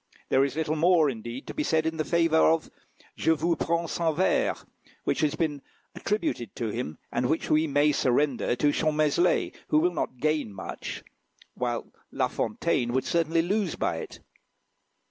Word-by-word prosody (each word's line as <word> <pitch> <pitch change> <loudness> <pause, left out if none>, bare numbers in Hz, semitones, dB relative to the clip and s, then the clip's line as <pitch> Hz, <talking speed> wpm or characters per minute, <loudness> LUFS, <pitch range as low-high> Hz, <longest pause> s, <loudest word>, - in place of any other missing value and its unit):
There 130 - +4
is 140 0 -1
little 160 0 -1
more, 160 -2 +4
indeed, 120 +2 -7
to - - -7
be 305 - -2
said 160 - +1
in 160 -1 -1
favour 165 +1 +2
of 160 -1 -1 0.4
"Je - - -1
vous 165 +2 +1
prends 170 0 -1
sans 165 -2 0
Verts," 185 - +1 0.4
which - - 0
has 155 0 +1
been 150 -3 -1 0.3
attributed 210 - -2
to 115 -2 -2
him, 105 -8 -4
and 125 - 0
which 160 - -1
we 155 +1 +3
may 145 +1 +3
surrender 130 -2 +1
to 145 +4 +2
Champmeslé, 155 +2 +2
who 150 - +2
will 175 +3 +3
not 130 -5 -3
gain 150 -4 0
much, - - -6 0.5
while 120 -1 -2 0.3
La - - +1
Fontaine 120 0 -1
would 130 - 0
certainly 165 0 +1
lose 195 0 0
by - - -1
it. - - -8
155 Hz, 165 wpm, -27 LUFS, 135-165 Hz, 0.5 s, There